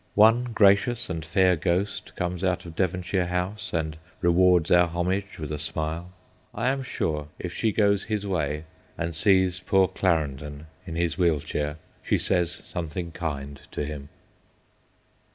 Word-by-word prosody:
One 115 +4 +6
gracious 115 0 +3
and 80 -2 -3
fair 90 +3 +3
ghost 90 +5 -1
comes 90 +1 -3
out 90 -1 0
of 85 -2 -9
Devon 90 0 0
shire 90 0 0
House 95 +4 -3
and 80 -2 -2 0.2
rewards 90 -1 +4
our 90 0 +6
homage 90 +4 -2
with 75 -2 -5
a 75 - -3
smile. 80 +2 -3 0.5
I 115 +4 +1
am 135 0 0
sure 75 - -2
if 90 -1 -5
she 110 +3 +1
goes 100 -2 +2
his 105 -2 -2
way, 75 -6 -1 0.3
and 85 0 -2
sees 95 +1 +3
poor 95 0 +3
Clarendon 75 -5 -1 0.2
in 80 - -5
his 85 +1 -1
wheel 85 -4 +3
chair, 75 +1 -3 0.2
she - - +1
says 90 -3 +1
something 85 0 -5
kind 70 -5 -5
to 75 - -3
him. 70 -1 -7
90 Hz, 155 wpm, -26 LUFS, 80-95 Hz, 0.5 s, One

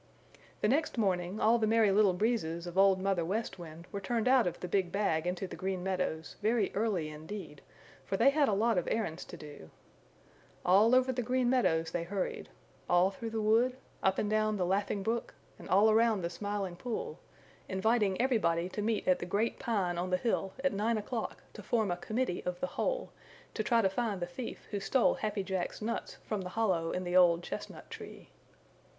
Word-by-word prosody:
The - - +3
next 295 0 +1
morning 190 -2 0
all 230 +2 +4
the 220 - +1
Merry 220 -2 +4
Little 200 -1 +4
Breezes 180 -5 -1
of 175 0 -7
Old 195 0 +5
Mother 190 -2 0
West 195 +3 -3
Wind 165 0 -10
were 200 - -4
turned 230 +4 -1
out 255 -5 +5
of 175 - -3
the 180 - -5
big 185 -1 0
bag 175 -5 0
into 180 +2 -2
the 185 - -7
Green 190 -1 -3
Meadows 180 -5 -2
very 215 -1 +1
early 200 -7 0
indeed, 160 +7 -8 0.4
for - - -2
they 275 - +5
had 290 -1 +3
a - - +1
lot 220 0 +2
of 175 - -5
errands 190 -7 -2
to 175 - -10
do. 145 - -11 1.0
All 210 +7 +5
over 255 0 +4
the 250 0 -2
Green 250 +1 +1
Meadows 165 -11 +2
they 175 - -1
hurried, 190 +2 -3 0.4
all 175 +2 +4
through 225 +3 -6
the 220 -1 -2
wood, 235 +4 +3 0.2
up 190 0 +2
and 210 - 0
down 215 0 +1
the 180 - 0
Laughing 195 +2 0
Brook 230 +3 -2 0.2
and - - -11
all 205 +4 +5
around 220 -2 +3
the 170 - -2
Smiling 195 -1 -3
Pool, 255 - -4 0.5
inviting 200 0 +1
everybody 185 -9 +1
to 210 - -4
meet 215 0 -1
at 185 - +4
the - - -5
Great 210 +5 0
Pine 190 -8 -1
on 180 +1 -2
the 185 - +2
hill 195 -2 -1
at 275 - +2
nine 220 +3 +1
o'clock 225 +2 -4
to - - -9
form 220 -6 0
a - - 0
committee 215 0 -2
of 180 0 -3
the - - 0
whole - - -1 0.4
to - - -1
try 230 +1 +2
to - - +5
find 210 -1 -2
the 175 - -1
thief 175 +8 -7
who 205 - -1
stole 245 +5 +3
Happy 210 -2 -2
Jack's 190 -2 -3
nuts 230 +2 -3
from 210 -3 -2
the 180 - -5
hollow 180 -5 0
in 180 - -2
the 175 0 -2
old 175 -2 +5
chestnut - - -7
tree. - - -10
200 Hz, 205 wpm, -32 LUFS, 180-225 Hz, 1.0 s, Old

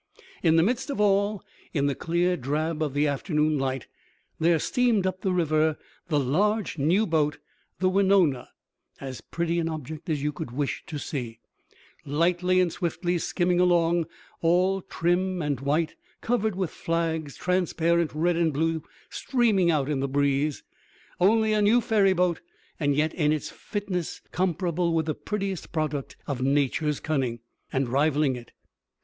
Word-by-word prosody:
In 165 -2 +4
the 165 - +5
midst 250 - 0
of 275 - -3
all, 205 0 +2 0.3
in 140 -2 +2
the 140 - +1
clear 175 +4 0
drab 155 +3 -2
of 145 -3 -1
the 145 +1 +3
afternoon 150 +1 0
light, 135 -3 -2 0.5
there 165 +1 +4
steamed 230 +3 +1
up 185 0 -2
the 190 - 0
river 155 -3 +2 0.3
the 150 -4 +1
large 195 - 0
new 175 +10 +3
boat, 150 -4 +1 0.4
the 185 - +1
Wenonah, 185 -8 +3 0.5
as 130 -2 -7
pretty 170 0 -2
an 165 -1 -1
object 155 +2 -6
as 150 -3 -1
you 150 - +1
could 155 -2 -6
wish 140 +3 -2
to 155 - -5
see, 125 -6 -5 0.7
lightly 175 +5 +2
and 180 -2 +2
swiftly 175 0 -1
skimming 175 +1 0
along, 170 -2 +3 0.3
all 185 +3 +2
trim 180 +2 0
and 145 -5 -1
white, 150 +4 0 0.3
covered 220 -4 0
with 185 -4 -2
flags, 160 -3 -2
transparent 170 -2 +1
red 170 +3 +2
and 165 -3 +2
blue 160 +2 0 0.3
streaming 225 -9 +2
out 150 -5 +1
in 145 -2 -1
the 135 - 0
breeze. 140 +1 0 0.6
Only 220 +3 +4
a 210 - +2
new 215 +4 +5
ferryboat, 195 -7 +2 0.4
and 145 -3 +1
yet 155 +2 +1
in 150 -3 +1
its 155 -1 -2
fitness 195 -5 -4
comparable 175 -2 0
with 160 -1 +1
the 155 - -1
prettiest 195 -2 -4
product 155 -4 -3
of 135 -4 -3
Nature's 145 +2 +1
cunning, 130 -7 -1 0.3
and 135 -1 0
rivaling 140 +1 +2
it. 120 -1 -10
165 Hz, 155 wpm, -26 LUFS, 150-185 Hz, 0.7 s, the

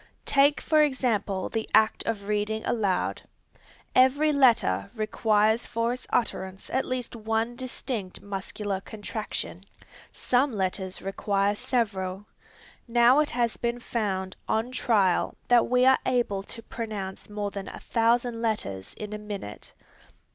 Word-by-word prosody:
Take 280 +1 +4
for 310 -1 +4
example 235 -9 0
the 225 -1 -3
act 220 0 +4
of 200 -3 -2
reading 210 +1 -1
aloud. 205 -6 0 0.7
Every 285 +4 +5
letter 230 - +3
requires 215 0 +2
for 230 +1 0
its 250 - -9
utterance 190 -5 -2
at 260 - +1
least 250 -2 -4
one 225 +1 -1
distinct 245 -6 -4
muscular 200 0 -4
contraction. 210 -3 -5 0.5
Some 255 +1 +1
letters 190 -1 -2
require 195 +1 +1
several. 200 -4 -2 0.6
Now 240 +3 +5
it 300 - +2
has 235 -2 0
been 235 0 -2
found 195 -6 -2
on 225 +3 0
trial 205 -8 +2
that 245 -1 +5
we 250 0 +3
are 265 0 +6
able 240 -6 +1
to 230 +3 -9
pronounce 210 -6 -6
more 205 -1 -3
than 200 -1 -6
a - - -9
thousand 235 0 +1
letters 100 - -2
in 210 0 -6
a 210 - -4
minute. 205 - -5
220 Hz, 135 wpm, -27 LUFS, 200-245 Hz, 0.7 s, are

